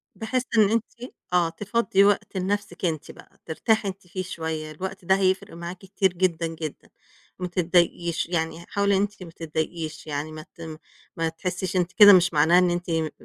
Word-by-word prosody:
بحيث 245 Hz, +3 st, -1 dB
إن 210 Hz, -2 st, +6 dB
أنتِ 235 Hz, +2 st, -3 dB, 0.2 s
آه، 175 Hz, -2 st, +3 dB
تفضّي 200 Hz, +2 st, +1 dB
وقت 200 Hz, -1 st, +1 dB
لنَفْسِك 195 Hz, -1 st, -2 dB
أنتِ 155 Hz, -3 st, -2 dB
بقى -, -, -18 dB
ترتاحي 210 Hz, +6 st, +1 dB
أنت 190 Hz, -1 st, -7 dB
فيه 185 Hz, +1 st, -4 dB
شوية، 160 Hz, -3 st, -4 dB
الوقت 190 Hz, +3 st, -7 dB
ده 190 Hz, -, +4 dB
هيفرق 190 Hz, -1 st, 0 dB
معاكِ 170 Hz, +2 st, -6 dB
كتير 195 Hz, -1 st, 0 dB
جدًا، 170 Hz, -2 st, 0 dB
جدًا. 160 Hz, -2 st, -7 dB, 0.5 s
ما 180 Hz, -, -2 dB
تتضايقيش، 175 Hz, -1 st, +1 dB
يعني 160 Hz, -1 st, -1 dB
ه -, -, -17 dB
حاولي 200 Hz, -1 st, +2 dB
إن -, -, +2 dB
أنتِ 205 Hz, -2 st, -3 dB
ما 165 Hz, -, -10 dB
تتضايقيش 160 Hz, 0 st, -4 dB
يعني 150 Hz, +1 st, -3 dB
ما 155 Hz, +1 st, -9 dB
تم 165 Hz, -2 st, -8 dB, 0.4 s
ما 165 Hz, 0 st, 0 dB
تحسّيش 180 Hz, +3 st, -4 dB
أنتِ 180 Hz, -1 st, +1 dB
كده 205 Hz, -1 st, +9 dB
مش 175 Hz, -2 st, +4 dB
معناها 165 Hz, +4 st, +5 dB
إن 180 Hz, -1 st, +3 dB
أنتِ 175 Hz, 0 st, -3 dB
م 165 Hz, -1 st, +1 dB
آآ 155 Hz, -, -4 dB
180 Hz, 190 wpm, -25 LUFS, 165-195 Hz, 0.5 s, كده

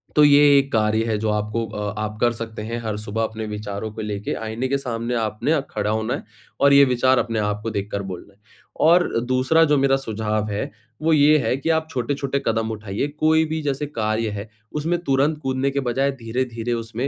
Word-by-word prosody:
तो 150 Hz, -, +6 dB
ये 145 Hz, 0 st, +7 dB
एक 140 Hz, 0 st, +1 dB
कार्य 110 Hz, 0 st, +2 dB
है 110 Hz, -2 st, 0 dB
जो 110 Hz, +1 st, -1 dB
आपको 105 Hz, +2 st, -1 dB
अ, 105 Hz, -1 st, -4 dB
आप 105 Hz, 0 st, -4 dB
कर 120 Hz, -, +4 dB
सकते 115 Hz, -1 st, -6 dB
हैं 115 Hz, +2 st, -4 dB
हर 110 Hz, -2 st, -2 dB
सुबह 105 Hz, +1 st, -3 dB
अपने 110 Hz, 0 st, -4 dB
विचारों 105 Hz, 0 st, -5 dB
को 110 Hz, -, -6 dB
लेके 105 Hz, -1 st, -3 dB
आइने 110 Hz, +4 st, -2 dB
के 140 Hz, +1 st, +1 dB
सामने 120 Hz, -2 st, -3 dB
आपने 110 Hz, +4 st, -1 dB
अ, 160 Hz, -, +3 dB
खड़ा -, -, -1 dB
होना 110 Hz, 0 st, -1 dB
है -, -, -4 dB, 0.4 s
और 140 Hz, 0 st, +6 dB
ये 140 Hz, 0 st, +8 dB
विचार 130 Hz, 0 st, +3 dB
अपने 115 Hz, -2 st, -1 dB
आप 105 Hz, 0 st, -1 dB
को 115 Hz, -, -2 dB
देखकर 100 Hz, -1 st, -3 dB
बोलना 90 Hz, +3 st, -9 dB
है। 100 Hz, -, -32 dB, 0.5 s
और 175 Hz, +2 st, +5 dB, 0.2 s
दूसरा 130 Hz, +6 st, +3 dB
जो 150 Hz, -1 st, +3 dB
मेरा 135 Hz, 0 st, +3 dB
सुझाव 110 Hz, -4 st, -2 dB
है 100 Hz, -, -2 dB, 0.3 s
वो 160 Hz, +1 st, +3 dB
ये 150 Hz, 0 st, +6 dB
है 130 Hz, -, 0 dB
कि 140 Hz, -, -3 dB
आप 160 Hz, -1 st, +1 dB
छोटे-छोटे 140 Hz, +1 st, -2 dB
कदम 115 Hz, 0 st, 0 dB
उठाइए 105 Hz, +3 st, -3 dB
कोई 160 Hz, 0 st, +4 dB
भी 160 Hz, 0 st, -3 dB
जैसे 145 Hz, 0 st, -2 dB
कार्य 110 Hz, -5 st, -1 dB
है, 105 Hz, +1 st, -6 dB, 0.2 s
उसमें 160 Hz, +4 st, -1 dB
तुरंत 140 Hz, +1 st, +2 dB
कूदने 135 Hz, 0 st, 0 dB
के 140 Hz, -, -1 dB
बजाय 135 Hz, +2 st, 0 dB
धीरे-धीरे 120 Hz, 0 st, -2 dB
उसमें 115 Hz, +2 st, -3 dB
115 Hz, 215 wpm, -22 LUFS, 110-140 Hz, 0.5 s, ये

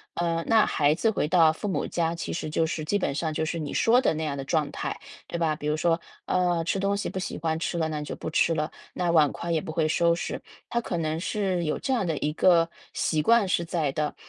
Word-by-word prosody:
呃， 170 Hz, -1 st, 0 dB
那 225 Hz, -1 st, +5 dB
孩 145 Hz, 0 st, +2 dB
子 200 Hz, +8 st, +1 dB
回 210 Hz, -, 0 dB
到 165 Hz, -1 st, +5 dB
父 185 Hz, -, -5 dB
母 190 Hz, -, -1 dB
家， 165 Hz, -1 st, 0 dB
其 170 Hz, -, -4 dB
实 165 Hz, -2 st, -3 dB
就 160 Hz, +1 st, +1 dB
是 155 Hz, 0 st, -3 dB
基 205 Hz, +6 st, +1 dB
本 140 Hz, -, -1 dB
上 160 Hz, 0 st, -1 dB
就 160 Hz, -, -1 dB
是 170 Hz, -, -2 dB
你 150 Hz, -3 st, -4 dB
说 240 Hz, +3 st, +4 dB
的 255 Hz, -, +2 dB
那 160 Hz, 0 st, -3 dB
样 140 Hz, -2 st, -3 dB
的 135 Hz, -, -4 dB
状 150 Hz, +1 st, 0 dB
态， -, -, -4 dB, 0.3 s
对 170 Hz, -, -5 dB
吧？ 160 Hz, -2 st, +1 dB
比 150 Hz, -, -8 dB
如 150 Hz, +1 st, +1 dB
说， 165 Hz, +1 st, +2 dB, 0.3 s
呃， 175 Hz, -2 st, +1 dB
吃 195 Hz, -, 0 dB
东 200 Hz, +1 st, +1 dB
西 205 Hz, -, -2 dB
不 -, -, -6 dB
喜 185 Hz, -, -3 dB
欢 160 Hz, 0 st, -1 dB
吃 170 Hz, +1 st, -2 dB
了， 160 Hz, -1 st, +1 dB
那 155 Hz, -1 st, -3 dB
你 150 Hz, -, -5 dB
就 -, -, -5 dB
不 -, -, -5 dB
吃 165 Hz, +1 st, +2 dB
了， 155 Hz, 0 st, -1 dB, 0.2 s
那 180 Hz, -1 st, -1 dB
碗 155 Hz, -4 st, +4 dB
筷 170 Hz, -, -5 dB
也 160 Hz, -, +1 dB
不 160 Hz, -, -6 dB
会 155 Hz, 0 st, +1 dB
收 170 Hz, +2 st, +3 dB
拾， 170 Hz, -, -4 dB, 0.3 s
她 235 Hz, -, 0 dB
可 180 Hz, -, -3 dB
能 160 Hz, -1 st, -1 dB
是 185 Hz, -1 st, -1 dB
有 155 Hz, -, -1 dB
这 265 Hz, -, -1 dB
样 230 Hz, -6 st, +1 dB
的 160 Hz, -3 st, -1 dB
一 150 Hz, +1 st, -1 dB
个 165 Hz, 0 st, +4 dB, 0.2 s
习 155 Hz, -2 st, 0 dB
惯 230 Hz, +3 st, +4 dB
是 170 Hz, -1 st, +1 dB
在 165 Hz, -4 st, -1 dB
的， 150 Hz, 0 st, -1 dB
165 Hz, 290 characters per minute, -26 LUFS, 155-180 Hz, 0.3 s, 那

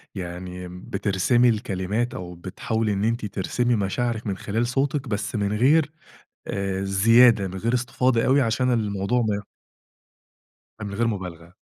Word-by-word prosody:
يعني 90 Hz, 0 st, -6 dB
بترسمي 100 Hz, +6 st, +1 dB
الكلمات 105 Hz, +2 st, -1 dB
أو 90 Hz, -1 st, -7 dB
بتحاولي 105 Hz, +4 st, -2 dB
إن 100 Hz, +1 st, -1 dB
أنتِ 115 Hz, 0 st, 0 dB
ترسمي 115 Hz, +5 st, 0 dB
مشاعرِك 110 Hz, +3 st, -1 dB
من 95 Hz, -1 st, -2 dB
خلال 115 Hz, +3 st, -1 dB
صوتِك، 135 Hz, +1 st, -1 dB
بس 105 Hz, 0 st, -3 dB
من 100 Hz, 0 st, 0 dB
غير 145 Hz, +7 st, +3 dB, 0.6 s
آآ 95 Hz, -1 st, -2 dB
زيادة، 110 Hz, +2 st, +5 dB
من 95 Hz, +1 st, -7 dB
غير 115 Hz, +5 st, -1 dB
استفاضة 125 Hz, -1 st, +1 dB
أوي 140 Hz, +2 st, +4 dB
عشان 125 Hz, +2 st, +1 dB
الموضوع 105 Hz, +2 st, 0 dB
ما 105 Hz, -2 st, 0 dB, 1.4 s
من 100 Hz, -1 st, -5 dB
غير 115 Hz, +1 st, +1 dB
مُبالغة. 90 Hz, -4 st, -6 dB
105 Hz, 140 wpm, -24 LUFS, 95-120 Hz, 1.4 s, زيادة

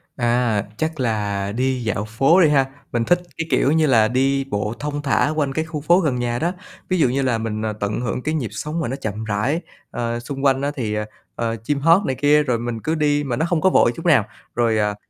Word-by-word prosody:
À, 120 Hz, -4 st, +1 dB, 0.2 s
chắc 160 Hz, -2 st, -2 dB
là 100 Hz, -4 st, -1 dB
đi 130 Hz, +1 st, -1 dB
dạo 105 Hz, -1 st, -2 dB
phố 135 Hz, -, +3 dB
đi 155 Hz, -, +5 dB
ha, 135 Hz, -2 st, +4 dB, 0.3 s
mình 120 Hz, -1 st, 0 dB
thích, 175 Hz, 0 st, +3 dB, 0.2 s
cái 165 Hz, -, -3 dB
kiểu 140 Hz, -, +3 dB
như 160 Hz, -1 st, +3 dB
là, 115 Hz, -4 st, +4 dB
đi 135 Hz, +3 st, +1 dB
bộ 105 Hz, -4 st, -2 dB
thong 145 Hz, 0 st, -3 dB
thả 145 Hz, +1 st, +2 dB
quanh 140 Hz, -3 st, 0 dB
cái 160 Hz, +2 st, -1 dB
khu 155 Hz, -2 st, -5 dB
phố 170 Hz, +5 st, +4 dB
gần 150 Hz, -8 st, 0 dB
nhà 120 Hz, 0 st, -1 dB
đó. 170 Hz, +3 st, 0 dB, 0.4 s
Ví 185 Hz, -, +1 dB
dụ 130 Hz, -, +4 dB
như 135 Hz, +2 st, 0 dB
là 125 Hz, -4 st, +1 dB
mình, 110 Hz, -1 st, -3 dB
à, 110 Hz, -, -1 dB
tận 105 Hz, +3 st, -2 dB
hưởng 125 Hz, +1 st, -2 dB
cái 155 Hz, +4 st, -2 dB
nhịp 125 Hz, -10 st, -2 dB
sống 150 Hz, +9 st, -4 dB
mà 155 Hz, -, -1 dB
nó 130 Hz, -, -3 dB
chậm 110 Hz, -5 st, -5 dB
rãi, 110 Hz, +10 st, -1 dB, 0.3 s
ờ, 120 Hz, 0 st, -2 dB
xung 135 Hz, +3 st, -5 dB
quanh 135 Hz, -1 st, +3 dB
á, 140 Hz, +1 st, 0 dB
thì, 115 Hz, -7 st, -2 dB
ờ, 105 Hz, 0 st, -2 dB, 0.3 s
ờ, 115 Hz, -1 st, -2 dB
chim 145 Hz, +2 st, -1 dB
hót 165 Hz, +7 st, +4 dB
này 130 Hz, -, -1 dB
kia, 145 Hz, +3 st, +4 dB
rồi 125 Hz, -5 st, 0 dB
mình 120 Hz, -1 st, -4 dB
cứ 160 Hz, +1 st, -1 dB
đi 145 Hz, -1 st, +1 dB
mà 125 Hz, -4 st, -2 dB
nó 160 Hz, -, 0 dB
hông 170 Hz, -3 st, +1 dB
có 190 Hz, -, +5 dB
vội 120 Hz, -, +4 dB
chút 165 Hz, -, -9 dB
nào, 145 Hz, -, +4 dB, 0.3 s
rồi, 115 Hz, -2 st, +2 dB
à, 105 Hz, -1 st, 0 dB
130 Hz, 255 wpm, -21 LUFS, 115-150 Hz, 0.4 s, đi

